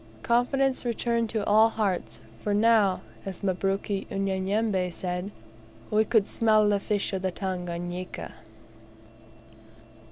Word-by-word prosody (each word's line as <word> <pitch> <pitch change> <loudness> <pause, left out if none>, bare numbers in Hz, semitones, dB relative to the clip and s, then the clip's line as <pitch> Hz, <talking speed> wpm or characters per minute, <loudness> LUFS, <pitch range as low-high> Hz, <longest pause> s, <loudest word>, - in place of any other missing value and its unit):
Confidence 260 +3 +2
returned 235 -1 0
to 215 -2 -2
all 220 +2 +5
hearts 205 -5 -2 0.2
for 205 -1 0
now, 210 -3 +4 0.2
as 195 -1 -7
Mabruk 195 +1 0 0.2
Unyanyembe 195 0 0
said, 180 +2 -4 0.6
"we 215 +1 +3
could 220 -4 +3
smell 215 -2 +3
the 205 -1 +2
fish 205 0 -1
of 190 - -1
the 190 - 0
Tanganika." 180 -1 -5
200 Hz, 115 wpm, -27 LUFS, 185-220 Hz, 0.6 s, all